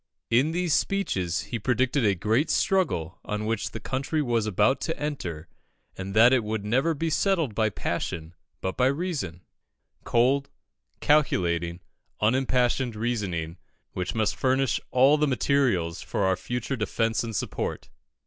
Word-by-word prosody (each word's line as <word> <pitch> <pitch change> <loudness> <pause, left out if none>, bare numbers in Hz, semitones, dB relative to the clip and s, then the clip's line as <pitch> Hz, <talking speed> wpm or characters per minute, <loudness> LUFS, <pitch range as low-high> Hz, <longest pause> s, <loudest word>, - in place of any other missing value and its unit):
In 125 +6 +4
these 175 -1 0
speeches 95 - 0
he 115 - -5
predicted 130 +3 +1
the 100 -3 +3
great 110 - +1
struggle 95 - 0
on 105 0 -3
which 110 -1 -1
the - - -7
country 135 +4 -2
was 120 -6 0
about 130 +7 +2
to 165 - -3
enter, 90 - -4 0.5
and 95 +1 -6
that 120 +4 +7
it 125 -3 +3
would 105 -1 -3
never 135 +9 +1
be 165 +2 -2
settled 165 - +1
by 110 +1 +1
passion 80 -4 -4 0.3
but 95 - -2
by 125 - +3
reason 140 - -2 0.6
"cold, 135 +4 +2 0.5
calculating, 85 - +1 0.4
unimpassioned 125 +1 +1
reasoning, 95 -8 -2 0.3
which 90 +3 -4
must 110 -3 +1
furnish 130 0 +1
all 135 +4 +5
the 150 - +3
materials 125 -11 +1
for - - -2
our 95 0 +3
future 125 +6 -3
defence 115 0 0
and 115 -2 -5
support." - - -3
120 Hz, 145 wpm, -26 LUFS, 100-140 Hz, 0.6 s, that